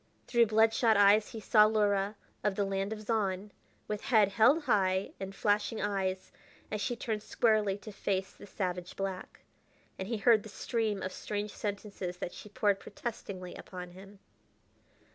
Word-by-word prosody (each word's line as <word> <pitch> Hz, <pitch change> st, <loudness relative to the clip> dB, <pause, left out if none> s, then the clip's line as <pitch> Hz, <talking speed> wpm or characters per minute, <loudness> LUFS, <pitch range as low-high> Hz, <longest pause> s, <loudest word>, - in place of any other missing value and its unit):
Through 235 Hz, -2 st, +4 dB
blood 220 Hz, +1 st, +4 dB
shot 225 Hz, -3 st, +3 dB
eyes 205 Hz, +1 st, +5 dB
he 225 Hz, -, -7 dB
saw 210 Hz, 0 st, +5 dB
Luhra, 205 Hz, -1 st, +1 dB, 0.3 s
of 205 Hz, -1 st, +1 dB
the 200 Hz, -, +1 dB
land 195 Hz, +1 st, -2 dB
of 215 Hz, -1 st, -5 dB
Zahn, 205 Hz, -2 st, -1 dB, 0.4 s
with 210 Hz, -1 st, -3 dB
head 220 Hz, -7 st, +5 dB
held 265 Hz, +10 st, +4 dB
high 190 Hz, -7 st, +2 dB
and 195 Hz, 0 st, -6 dB
flashing 210 Hz, +2 st, +1 dB
eyes 190 Hz, -2 st, -2 dB, 0.4 s
as 210 Hz, 0 st, -2 dB
she 245 Hz, -, -1 dB
turned 220 Hz, -2 st, -3 dB
squarely 215 Hz, -3 st, +2 dB
to 210 Hz, +1 st, -10 dB
face 195 Hz, -1 st, -2 dB
the -, -, -13 dB
savage 180 Hz, -2 st, -4 dB
black. 195 Hz, -1 st, -5 dB, 0.6 s
And 190 Hz, -, -4 dB
he 230 Hz, 0 st, -1 dB
heard 220 Hz, +1 st, +5 dB
the 215 Hz, -, -11 dB
stream 215 Hz, -2 st, -2 dB
of 185 Hz, -, -4 dB
strange 210 Hz, 0 st, -4 dB
sentences 200 Hz, -3 st, -4 dB
that 175 Hz, -, -5 dB
she 210 Hz, -, -10 dB
poured 205 Hz, -1 st, +1 dB
protestingly 195 Hz, -6 st, -6 dB
upon 180 Hz, -1 st, -8 dB
him. 195 Hz, +3 st, -13 dB
205 Hz, 165 wpm, -31 LUFS, 195-215 Hz, 0.6 s, eyes